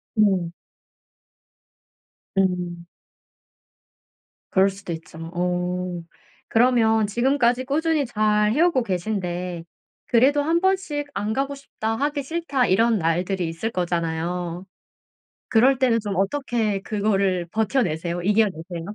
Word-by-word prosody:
음. 190 -6 +2 1.8
음. 180 -3 -1 1.6
그럴 190 +1 +4
수도 195 -2 -7
있죠. 160 0 -10 0.2
어. 180 0 -2 0.5
그러면 225 -2 +3
지금까지 245 +2 +1
꾸준히 305 +1 +1
잘 210 -2 +2
해 295 - +2
오고 335 -8 +3
계신데 180 -3 -3 0.4
그래도 270 +5 +4
'1 330 +3 +1
번씩 370 -7 0
안 210 +2 -2
가고 275 +3 -1
싶다. 225 -5 -4
하기 285 +1 -1
싫다.' 285 -4 -1
이런 225 +4 +3
날들이 180 +1 0
있을 165 +8 -4
거잖아요. 175 0 -2 0.8
그럴 255 +3 +4
때는 250 -3 +3
좀 205 -2 -4
어떻게 215 -1 0
그거를 195 -4 0
버텨 220 +4 +1
내세요? 170 -1 -2
이겨 210 +4 +4
내세요? 170 -1 -7
210 Hz, 230 characters per minute, -23 LUFS, 180-255 Hz, 1.8 s, 그럴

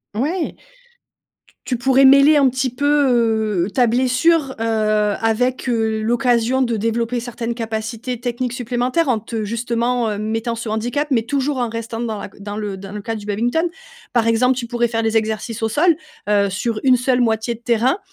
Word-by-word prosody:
Ouais. 310 - -1
T - - -33 1.1
tu 250 - 0
pourrais 265 +2 +4
mêler 275 +3 +7
un 275 -2 +5
petit 260 0 -1
peu, 235 -8 +2
heu, 205 - -6
ta 245 -2 +3
blessure, 260 +4 +2
heu, - - -1 0.6
avec, 245 +3 0
heu, 220 -2 0
l'occasion 240 +2 +1
de 235 -2 0
développer 230 +2 -1
certaines 235 0 -4
capacités 225 +2 -4
techniques 245 0 -2
supplémentaires 250 +5 -1
en 235 -3 +2
te 220 0 -5
justement, 235 +1 -1
heu 205 - -3
mettant 225 +2 -2
ce 230 -1 -6
handicap, 245 +7 -1
mais 230 -4 +2
toujours 275 +3 -1
en 245 -2 -1
restant 230 0 -5
dans 225 -3 -3
la - - -5
c - - -15
dans 205 +1 -6
le 210 -2 -4
dans 195 +1 -9
le 210 - -6
cas 225 +2 -3
du 210 -1 -9
badminton. 240 +11 0 0.4
Par 230 -2 +2
exemple, 250 +3 +3
tu 240 - -3
pourrais 240 0 +1
faire 225 -1 -2
des 225 0 0
exercices 220 +1 -1
au 225 - 0
sol, 315 +7 +3 0.3
heu, 200 -1 +2
sur 215 +3 -2
une 255 -1 +6
seule 250 0 +1
moitié 225 0 0
de - - -24
terrain, 240 - +1
235 Hz, 190 wpm, -19 LUFS, 220-255 Hz, 1.1 s, mêler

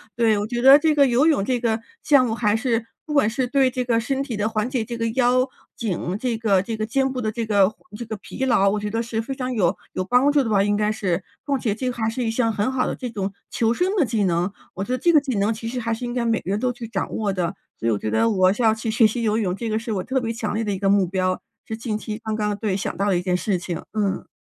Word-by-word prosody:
对， 225 -3 +3
我 205 - -2
觉 240 0 -2
得 270 +2 +9
这 310 0 +2
个 280 - +6
游 255 +5 +3
泳 300 -11 +3
这 245 +3 0
个 225 -2 0 0.2
项 280 -4 +5
目， 225 - -1
还 210 -2 +1
是 230 -1 0 0.2
不 300 - -5
管 280 -7 +4
是 250 +3 -1
对 265 +1 +3
这 255 0 -2
个 235 -2 +1
身 270 +3 -1
体 240 -6 -5
的 210 +1 0
缓 215 +1 -1
解， 255 -4 -1
这 235 +1 -6
个 230 - -1
腰、 255 +2 +2 0.3
颈， 190 -4 -2
这 240 -2 -1
个 200 -4 +2
这 225 +3 -4
个 215 - -1
肩 265 +4 +1
部 255 -1 -3
的 215 - -1
这 230 0 -3
个 205 -1 +3 0.3
这 235 - -6
个 220 0 -5
疲 265 +6 -4
劳， 200 -6 +4
我 210 +1 0
觉 210 0 -3
得 225 +2 -1
是 230 -1 -2
非 270 +4 -5
常 255 -1 -3
有 190 -5 +2 0.2
有 185 - -1
帮 250 +9 +3
助 285 -1 +3
的 225 - -3
吧， 200 -2 +3
应 205 0 +1
该 210 0 +1
是。 190 -4 -1 0.2
况 280 -2 +1
且 210 -4 0
这 250 +4 -2
还 225 -2 -1
是 245 +2 -3
一 225 - 0
项 225 0 +1
很 215 +4 0
好 255 -1 0
的 - - -1
这 250 - -5
种 200 -3 -3 0.2
求 230 0 +1
生 370 - 0
的 330 - +3
技 220 -3 0
能， 175 +1 0 0.2
我 190 - -3
觉 225 - -5
得 255 - +1
这 340 +7 +3
个 305 - +7
技 260 -7 -2
能， 205 +3 +2
其 225 +1 -7
实 250 +2 -3
还 230 -1 -1
是 225 - -5
应 240 - -4
该 245 -1 -1
每 225 -1 +1
个 185 - -7
人 205 - 0
都 250 0 0
去 235 -1 -8
掌 205 -4 -3
握 210 -2 0
的。 180 +1 -2 0.2
所 115 - -2
以 - - +3
我 105 - +1
觉 110 - -3
得 110 - +3
我 185 -3 +4
要 220 -2 +4
去 220 0 -3
学 225 0 +5
习 230 +2 -3
游 215 0 +1
泳， 185 -5 0
这 230 +3 -4
个 215 0 0
是 230 0 -5
我 190 -3 -2
特 260 +5 0
别 230 - -2
强 225 -2 -3
烈 220 +2 -1
的 210 - -2
一 - - -3
个 195 +1 0
目 195 -2 +4
标， 185 0 -1 0.2
是 220 - -4
近 225 -2 -3
期 215 0 -6
刚 220 -1 -2
刚 210 -1 -1
对， 205 -3 -1
想 200 - -3
到 200 - 0
的 190 -3 +2
一 175 - -1
件 180 0 0
事 185 +2 0
情， 175 -1 -5
嗯。 205 -3 -1
225 Hz, 330 characters per minute, -23 LUFS, 205-245 Hz, 0.3 s, 得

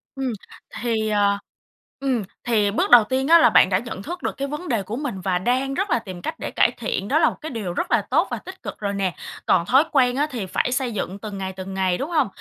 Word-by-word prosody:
Ừm. 265 -3 -2 0.5
Thì, 225 -2 0
ờ 205 -1 +2 0.6
ừm, 260 -6 0 0.2
thì 215 -4 +2
bước 205 - 0
đầu 240 -2 +9
tiên 260 +5 -1
á 335 +2 +8
là - - +6
bạn - - +5
đã 185 - +3
nhận 215 -4 -7
thức 350 - -6
được - - -3
cái 275 - -2
vấn 300 +5 -6
đề 225 -5 0
của 205 +4 -5
mình 255 -8 -4
và 185 -1 0
đang 260 +7 0
rất 390 +8 -1
là 240 -7 +2
tìm 185 -5 -9
cách - - -5
để - - -4
cải - - +3
thiện, 210 -4 -3
đó 290 +7 +3
là - - +5
một - - -8
cái 315 - -5
điều 205 -8 -4
rất - - -3
là - - +4
tốt - - +1
và - - -1
tích - - -11
cực - - -7
rồi 200 -1 -2
nè. 195 -3 -1 0.3
Còn 170 -2 +3
thói 265 +9 +5
quen 250 -4 +3
á, 290 +3 +1
thì 235 -7 -3
phải 190 +6 -1
xây 255 -1 0
dựng 195 -1 -4
từng 205 -2 -6
ngày, 190 -1 -4
từng 190 0 -7
ngày, 185 -2 +1
đúng 280 - -4
hông? 305 -5 +2
230 Hz, 270 wpm, -23 LUFS, 195-270 Hz, 0.6 s, đầu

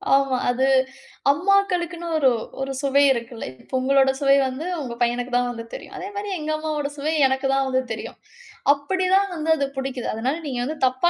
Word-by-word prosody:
ஆமா. 275 -2 +2
அது 255 +2 +2 0.7
அம்மாக்களுக்குனு 355 -1 +1
ஒரு, 270 -4 +5 0.3
ஒரு 270 0 -2
சுவை 280 0 +3
இருக்குல. 235 -1 -6 0.2
இப்போ - - -23
உங்களோட 270 0 +4
சுவை 275 -1 +5
வந்து, 260 +6 -5 0.2
உங்க 245 -3 -5
பையனுக்கு 245 +1 0
தான் 245 0 +1
வந்து 230 -1 -7
தெரியும். 400 - -8
அதே 375 +1 -5
மாரி 405 0 -4
எங்க 310 0 -3
அம்மாவோட 305 -2 -2
சுவை 305 +3 -1
எனக்கு 265 +1 0
தான் 270 0 +2
வந்து 260 0 +1
தெரியும். 220 - -7 0.6
அப்புடி 370 +7 -2
தான் 395 0 +3
வந்து 320 0 -3
அது 280 -3 0
புடிக்குது. 265 -2 -3
அதனால 250 +7 -1
நீங்க 255 -4 -3
வந்து 310 +2 -4
தப்பா 260 +7 +2
275 Hz, 185 wpm, -23 LUFS, 260-315 Hz, 0.7 s, ஒரு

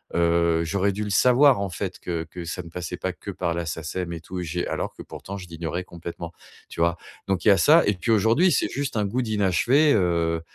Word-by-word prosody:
heu, 85 -1 +2
j'aurais 100 +4 +1
dû 105 +2 -4
le 105 - -4
savoir 125 +5 +5
en 100 - -2
fait 95 +1 -5
que 85 -2 -4
que 90 -1 -8
ça 85 +2 -4
ne 85 - -11
passait 90 +1 -5
pas 95 - -2
que 100 - -8
par 90 -2 -2
la 85 0 -3
SACEM 80 +2 -4
et 85 - -7
tout 90 +2 -7
et - - -3
j'ai 90 +1 -3
alors - - -3
que - - -11
pourtant 100 +1 -8
je 90 - -9
l'ignorais 85 +1 -4
complètement, 85 -1 -8 0.4
tu - - -9
vois? 85 0 +2 0.3
Donc 95 -2 -1
il - - +2
y - - +9
a 100 - +5
ça 155 - +6
et 105 - +3
puis 90 +6 -2
aujourd'hui, 115 - +4
c'est - - +1
juste 140 -3 -3
un 105 - +1
goût 120 +6 -1
d'inachevé, 115 - +3
heu, 85 -4 +1
90 Hz, 245 wpm, -24 LUFS, 85-105 Hz, 0.4 s, y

